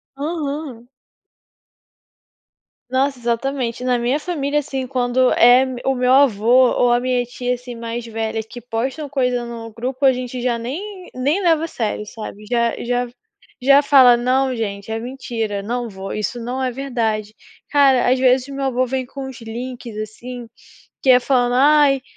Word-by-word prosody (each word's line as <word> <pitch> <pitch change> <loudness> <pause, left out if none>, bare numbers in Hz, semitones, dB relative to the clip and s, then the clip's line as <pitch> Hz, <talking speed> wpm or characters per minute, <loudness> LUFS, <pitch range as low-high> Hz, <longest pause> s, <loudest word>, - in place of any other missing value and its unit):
Aham. 285 -4 -4 2.0
Nossa, 265 +1 0
exatamente. 240 +1 -2
Na 250 -1 +2
minha 245 +4 +1
família, 295 -3 -1
assim, 270 -3 -4
quando 250 0 +2
é 245 +2 +6
me 255 -2 -6
o 270 - +2
meu 250 0 +2
avô 250 -1 +5
ou 245 - +2
a 240 - +2
minha 250 -1 0
tia, 245 +1 -3
assim, 245 0 -9
mais 230 0 -5
velha 225 -1 -3
que 230 +3 -11
postam 255 +6 -3
coisa 250 -3 0
no 230 -1 -7
grupo 255 +4 -2
a 265 - +6
gente 250 0 -5
já 240 -1 0
nem 360 - -6
nem 285 +9 0
leva 325 -2 +3
a - - -5
sério, 215 -7 -3
sabe, 210 -1 -9
já 235 -1 0
já 245 +1 -1 0.5
já 275 +2 +6
fala: 265 -4 +7
"Não, 255 +2 +1
gente, 200 -2 -4
é 225 0 -2
mentira. 230 -4 -4
Não 240 +3 -3
vô, 195 -1 -7
isso 215 +3 -3
não 250 +3 -3
é 255 - 0
verdade". 225 -5 -2 0.3
Cara, 275 -4 +4
às 255 - +3
vezes 255 0 +3
o 280 - -8
meu 275 0 -3
avô 255 -1 +1
vem 260 +1 -2
com 270 +1 -7
os 260 -2 -10
links, 240 0 -7
assim, 235 +3 -7 0.5
que 265 - +1
é 250 -1 +8
falando: 245 -1 +1
"Ai" 285 0 +5
250 Hz, 170 wpm, -20 LUFS, 235-270 Hz, 2.0 s, é